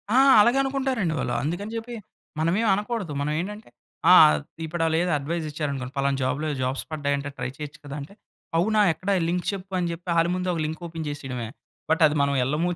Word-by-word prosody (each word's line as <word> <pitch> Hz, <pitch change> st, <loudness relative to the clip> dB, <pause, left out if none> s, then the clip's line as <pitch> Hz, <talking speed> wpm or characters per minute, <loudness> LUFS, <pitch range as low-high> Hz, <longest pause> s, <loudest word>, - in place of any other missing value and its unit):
ఆ! -, -, +5 dB, 0.2 s
అలాగే 235 Hz, +5 st, +4 dB
అనుకుంటారండి 265 Hz, -, -1 dB
వాళ్ళు. 120 Hz, -, -1 dB
అందుకని 175 Hz, +8 st, -3 dB
చెప్పి, 235 Hz, +1 st, -6 dB, 0.4 s
మనం 160 Hz, +1 st, +2 dB
ఏమి 230 Hz, -, +2 dB
అనకూడదు. 210 Hz, -5 st, -3 dB
మనం 150 Hz, +1 st, -1 dB
ఏంటంటే 210 Hz, -, -6 dB, 0.4 s
ఆ! -, -, +10 dB, 0.5 s
ఇప్పుడు 165 Hz, +1 st, -4 dB
వాళ్ళు 160 Hz, 0 st, +2 dB
ఏదో 180 Hz, -, 0 dB
అడ్వైస్ 160 Hz, +3 st, -3 dB
ఇచ్చారనుకోండి. 140 Hz, -4 st, -4 dB
ఫలానా 140 Hz, 0 st, +1 dB
జాబ్‌లో 145 Hz, +4 st, -1 dB
జాబ్స్ 130 Hz, +1 st, -1 dB
పడ్డాయంటే 145 Hz, -2 st, -1 dB
ట్రై 125 Hz, 0 st, -3 dB
చేయొచ్చు 150 Hz, +1 st, -8 dB
కదా! 145 Hz, -1 st, -7 dB
అంటే 145 Hz, +8 st, -10 dB, 0.4 s
"అవునా! 215 Hz, +5 st, +2 dB
ఎక్కడ 185 Hz, +5 st, -6 dB, 0.2 s
లింక్ 175 Hz, +1 st, -1 dB
చెప్పు" 195 Hz, -1 st, -8 dB
అని 175 Hz, -1 st, -1 dB
చెప్పి 170 Hz, +2 st, -8 dB
వాళ్ళ 165 Hz, +1 st, +3 dB
ముందు 185 Hz, 0 st, -3 dB
ఒక 165 Hz, -, -2 dB
లింక్ 160 Hz, +2 st, -5 dB
ఓపెన్ 165 Hz, -1 st, -6 dB
చేసేయడమే. 135 Hz, -5 st, -5 dB, 0.4 s
బట్, 160 Hz, +2 st, +2 dB
అది 150 Hz, 0 st, +2 dB
మనం 140 Hz, 0 st, +2 dB
వెళ్ళము 150 Hz, +7 st, 0 dB
160 Hz, 195 wpm, -25 LUFS, 145-185 Hz, 0.5 s, ఆ